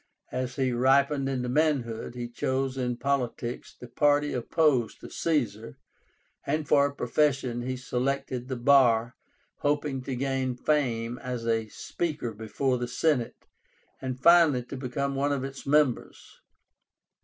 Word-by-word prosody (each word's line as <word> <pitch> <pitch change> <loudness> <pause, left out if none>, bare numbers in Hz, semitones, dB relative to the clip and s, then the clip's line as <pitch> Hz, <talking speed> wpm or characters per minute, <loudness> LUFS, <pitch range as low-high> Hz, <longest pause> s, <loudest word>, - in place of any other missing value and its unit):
As 125 0 -3
he 130 -2 0
ripened 135 +3 +2
into 125 -2 -2
manhood, 125 -5 0
he 120 -1 -4
chose 130 +2 -2
in 125 -2 -2
politics 125 -3 -2
the 125 - -9
party 145 +4 +2
opposed 130 -1 +1
to - - -10
Caesar, 115 -9 -2 0.7
and 150 +1 -2
for 140 0 +4
a 140 - -8
profession 130 -2 0
he 130 +1 -3
selected 130 0 -2
the 130 - -3
bar, 120 -2 +4 0.4
hoping 145 -2 -1
to 135 - -3
gain 130 -1 -1
fame 120 -4 0
as 125 -2 -5
a 115 -1 0
speaker 150 -7 -4
before 120 +4 -1
the 120 - -2
Senate, 125 -1 -1 0.6
and 130 -1 -4
finally 165 -5 +5
to 125 - -8
become 140 +2 -3
one 140 +1 0
of 140 -2 -1
its 135 0 -7
members. 145 -4 0
130 Hz, 140 wpm, -27 LUFS, 120-140 Hz, 0.7 s, finally